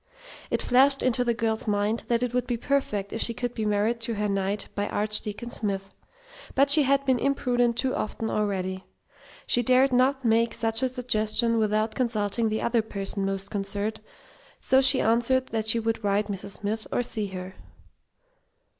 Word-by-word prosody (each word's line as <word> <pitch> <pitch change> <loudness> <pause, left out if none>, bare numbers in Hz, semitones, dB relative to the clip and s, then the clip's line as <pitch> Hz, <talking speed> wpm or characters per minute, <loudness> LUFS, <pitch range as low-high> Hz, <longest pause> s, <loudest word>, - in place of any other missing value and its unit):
It - - -1
flashed 270 +2 +3
into 250 -1 +1
the 235 -1 0
girl's 225 -1 -2
mind 210 +2 -1
that 235 0 +1
it 245 -1 -2
would 250 -1 -1
be 240 - -1
perfect 225 -7 -2
if 225 - -3
she 230 - -1
could 245 +1 -3
be 220 -3 -3
married 210 +3 0
to 230 0 -2
her 210 0 -1
knight 200 +1 -2
by 205 0 -2
Archdeacon 210 +2 -2
Smith; 195 -4 -4 0.6
but 280 +1 +4
she 305 +1 +8
had 275 0 +2
been 260 -2 +2
imprudent 245 -3 0
too 260 -1 +1
often 220 +1 -3
already. 190 -3 -2 0.6
She 245 - +2
dared 255 +2 +3
not 260 +1 +2
make 230 0 +2
such 225 -1 +3
a 260 - +1
suggestion 230 -2 +2
without 215 0 0
consulting 225 -2 -1
the 215 0 -2
other 235 -1 +2
person 200 -2 -3
most 195 0 -5
concerned, 205 +2 -3 0.6
so 265 0 +3
she 265 0 +6
answered 240 +3 +1
that 220 -1 -2
she 230 +1 +3
would 225 0 -2
write 205 +1 0
Mrs. 200 0 -5
Smith 215 +2 -3
or 245 - 0
see 215 -3 -2
her. 185 0 -7
225 Hz, 180 wpm, -26 LUFS, 205-245 Hz, 0.6 s, she